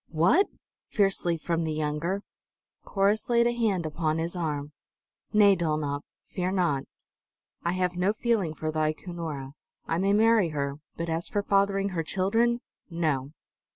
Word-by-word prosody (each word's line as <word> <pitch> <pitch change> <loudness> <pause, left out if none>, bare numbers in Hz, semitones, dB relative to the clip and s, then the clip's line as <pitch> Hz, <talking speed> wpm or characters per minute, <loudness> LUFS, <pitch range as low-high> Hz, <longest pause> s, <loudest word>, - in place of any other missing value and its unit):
"What!" 180 - +4 0.4
fiercely, 195 -5 +1
from 165 +1 -1
the 160 -1 -1
younger. 155 +6 -1 0.6
Corrus 200 +3 +1
laid 235 0 +4
a 240 - +3
hand 215 -8 0
upon 155 0 -1
his 165 +2 -2
arm. 150 -4 -2 0.6
"Nay, 205 -2 +6
Dulnop; 155 -4 -1 0.3
fear 180 -1 -2
not. 170 -8 +1 0.8
I 170 - 0
have 180 -1 0
no 180 +3 +2
feeling 210 -7 0
for 155 0 -3
thy 155 0 +1
Cunora; 155 -6 -6 0.3
I 165 - -1
may 195 +2 +2
marry 220 -3 +4
her, 140 -2 -2 0.2
but 170 - -3
as 165 +1 -2
for 205 -4 -1
fathering 195 0 +2
her 175 -3 -2
children 225 +8 +1 0.3
no!" 155 -5 -1
175 Hz, 150 wpm, -27 LUFS, 155-200 Hz, 0.8 s, Nay